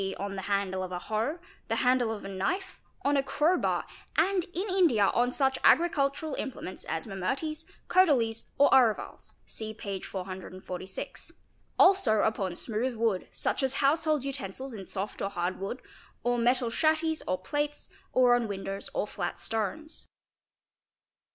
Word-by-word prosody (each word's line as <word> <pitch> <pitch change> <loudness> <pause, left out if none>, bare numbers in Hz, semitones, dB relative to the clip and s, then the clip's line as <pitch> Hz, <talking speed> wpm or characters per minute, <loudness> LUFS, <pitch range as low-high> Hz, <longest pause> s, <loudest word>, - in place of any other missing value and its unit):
on 200 0 -4
the 190 - -4
handle 195 -1 -1
of 185 -1 -4
a 180 - -2
hoe, 220 - -2 0.3
the - - 0
handle 250 -2 +3
of 215 -3 -5
a - - -4
knife, 195 - -3 0.2
on 285 +1 +3
a 275 - +4
crow 300 +6 +2
bar, - - 0 0.3
and 360 +2 +3
in 370 +2 -4
India 335 - +4
on 245 +1 +2
such 265 0 +1
agricultural 305 -2 +3
implements 235 -8 -5
as 160 0 -2
mamooties, 270 - -3 0.2
codalies, 255 -12 +3
or 285 - +7
aruvals 235 -5 +2
(see 220 -1 -5
p. 200 -3 -5
446); 185 0 -6 0.4
also 360 - +5
upon 195 -5 0
smooth 235 +5 -2
wood, 220 -4 0
such - - -1
as 265 0 +1
house 300 +5 +3
hold 305 -4 +2
utensils 265 -1 -4
in 195 -4 -8
soft 200 +1 -4
or 195 - 0
hard 180 -1 -2
wood, 200 +7 -4 0.4
or 245 0 +1
metal 245 0 +2
chatties 315 +2 +2
or 185 - +1
plates, 290 +10 -3 0.2
or 250 -1 +5
on 240 -2 0
windows 195 -1 -4
or - - +1
flat - - -4
stones. 305 +9 -3
240 Hz, 155 wpm, -29 LUFS, 195-295 Hz, 0.4 s, or